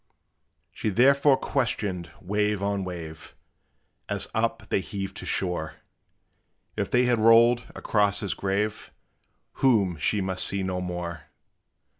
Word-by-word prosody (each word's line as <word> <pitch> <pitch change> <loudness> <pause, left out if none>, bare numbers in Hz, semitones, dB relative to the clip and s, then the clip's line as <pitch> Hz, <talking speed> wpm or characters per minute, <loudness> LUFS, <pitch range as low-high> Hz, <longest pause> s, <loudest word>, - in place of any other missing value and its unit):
She - - -3
therefore 135 +5 +4
questioned 105 -9 -2
wave 105 +1 -1
on 100 -1 -1
wave, 85 -4 -8 0.7
As - - 0
up - - -1
they - - +1
heaved 95 0 -6
to - - -7
shore, 90 -4 -2 1.0
If 100 -2 -2
they 125 +1 +3
had 120 -2 +2
rolled 115 +2 +5
across 100 -2 +1
his 100 - -2
grave, 100 +2 -2 0.7
Whom 100 -10 +3
she 100 +7 0
must 95 -1 -1
see 100 0 0
no 90 -1 -2
more. 90 -2 -5
100 Hz, 125 wpm, -26 LUFS, 90-110 Hz, 1.0 s, rolled